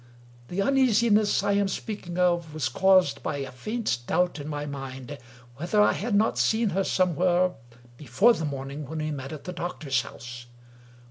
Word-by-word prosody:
The 195 Hz, +7 st, -1 dB
uneasiness 230 Hz, -6 st, +3 dB
I 205 Hz, -, +1 dB
am 200 Hz, 0 st, +2 dB
speaking 185 Hz, -2 st, -5 dB
of 175 Hz, -3 st, +1 dB
was 135 Hz, -6 st, -1 dB
caused 185 Hz, +2 st, +3 dB
by 150 Hz, -, -3 dB
a 135 Hz, -1 st, -5 dB
faint 205 Hz, -, -2 dB
doubt 180 Hz, -1 st, +1 dB
in 145 Hz, -, -6 dB
my 150 Hz, -1 st, -4 dB
mind 135 Hz, -1 st, -7 dB, 0.4 s
whether 175 Hz, +8 st, 0 dB
I 210 Hz, -, +5 dB
had 220 Hz, 0 st, -2 dB
not 215 Hz, +2 st, +2 dB
seen 220 Hz, 0 st, +2 dB
her 195 Hz, +3 st, +1 dB
somewhere, 180 Hz, 0 st, +2 dB, 0.5 s
before 150 Hz, -, +3 dB
the 165 Hz, -, -4 dB
morning 140 Hz, 0 st, -5 dB
when 160 Hz, -, -6 dB
we 155 Hz, 0 st, -2 dB
met 135 Hz, -2 st, -6 dB
at 155 Hz, -2 st, -8 dB
the 180 Hz, -, -6 dB
doctor's 155 Hz, -6 st, -2 dB
house. 120 Hz, 0 st, -10 dB
175 Hz, 175 wpm, -26 LUFS, 140-200 Hz, 0.5 s, I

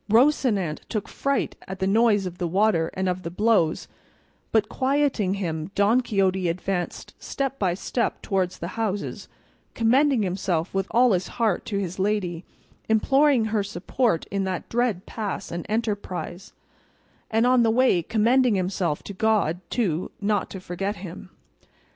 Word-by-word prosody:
Rocinante 220 Hz, -, +3 dB
took 215 Hz, -3 st, -3 dB
fright 275 Hz, 0 st, -1 dB
at 190 Hz, -, -6 dB
the 190 Hz, -, -1 dB
noise 210 Hz, 0 st, +3 dB
of 180 Hz, 0 st, -6 dB
the 175 Hz, -, 0 dB
water 180 Hz, -2 st, +2 dB
and 190 Hz, 0 st, -1 dB
of 180 Hz, 0 st, -1 dB
the 170 Hz, -, -5 dB
blows, 190 Hz, -3 st, +1 dB, 0.6 s
but 220 Hz, -2 st, +3 dB
quieting 265 Hz, -8 st, +1 dB
him 165 Hz, -4 st, -3 dB
Don 210 Hz, +5 st, +4 dB
Quixote 190 Hz, -5 st, +1 dB
advanced 180 Hz, +1 st, -3 dB
step 275 Hz, -1 st, -3 dB
by 180 Hz, -3 st, +1 dB
step 235 Hz, +5 st, -2 dB
towards 185 Hz, -3 st, -1 dB
the 170 Hz, -, -5 dB
houses, 210 Hz, -3 st, -3 dB, 0.5 s
commending 255 Hz, +1 st, +3 dB
himself 180 Hz, -2 st, -1 dB
with 195 Hz, 0 st, 0 dB
all 245 Hz, +1 st, +4 dB
his 185 Hz, -1 st, +1 dB
heart 220 Hz, -6 st, +1 dB
to 200 Hz, -, -2 dB
his 190 Hz, -1 st, -3 dB
lady, 190 Hz, -4 st, -1 dB, 0.5 s
imploring 270 Hz, +2 st, +4 dB
her 215 Hz, -, +2 dB
support 200 Hz, +1 st, -1 dB
in 195 Hz, 0 st, 0 dB
that 185 Hz, -2 st, -3 dB
dread 230 Hz, -5 st, 0 dB
pass 210 Hz, -4 st, -5 dB
and 170 Hz, 0 st, -5 dB
enterprise, 205 Hz, -4 st, -3 dB, 0.8 s
and 225 Hz, +2 st, +2 dB
on 250 Hz, 0 st, +5 dB
the 230 Hz, -, +3 dB
way 235 Hz, -6 st, +3 dB
commending 230 Hz, +5 st, +3 dB
himself 180 Hz, -4 st, -1 dB
to 200 Hz, -, -7 dB
God, 200 Hz, -5 st, +1 dB
too, 185 Hz, -8 st, -1 dB
not 205 Hz, -1 st, 0 dB
to 190 Hz, -, -7 dB
forget 195 Hz, +3 st, -3 dB
him. 185 Hz, -1 st, -9 dB
200 Hz, 155 wpm, -25 LUFS, 180-230 Hz, 0.8 s, on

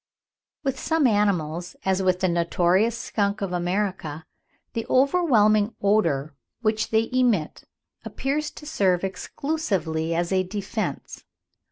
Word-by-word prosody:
With 270 Hz, -2 st, -1 dB
some 320 Hz, -3 st, +1 dB
animals, 180 Hz, -7 st, +1 dB
as 190 Hz, 0 st, +2 dB
with 185 Hz, -1 st, +1 dB
the 185 Hz, -, +3 dB
notorious 175 Hz, +6 st, +2 dB
skunk 200 Hz, -2 st, -1 dB
of 195 Hz, -3 st, -3 dB
America, 175 Hz, -4 st, -2 dB, 0.5 s
the 230 Hz, -, -2 dB
overwhelming 240 Hz, -, +3 dB
odour 165 Hz, -9 st, +1 dB, 0.3 s
which 220 Hz, 0 st, +1 dB
they 225 Hz, 0 st, +2 dB
emit 240 Hz, -11 st, +1 dB, 0.4 s
appears 295 Hz, +3 st, -2 dB
to 300 Hz, -, -12 dB
serve 190 Hz, -, +1 dB
exclusively 190 Hz, -, -2 dB
as 175 Hz, +1 st, -1 dB
a 190 Hz, -1 st, +3 dB
defence. 200 Hz, +4 st, -4 dB
200 Hz, 120 wpm, -24 LUFS, 175-230 Hz, 0.5 s, the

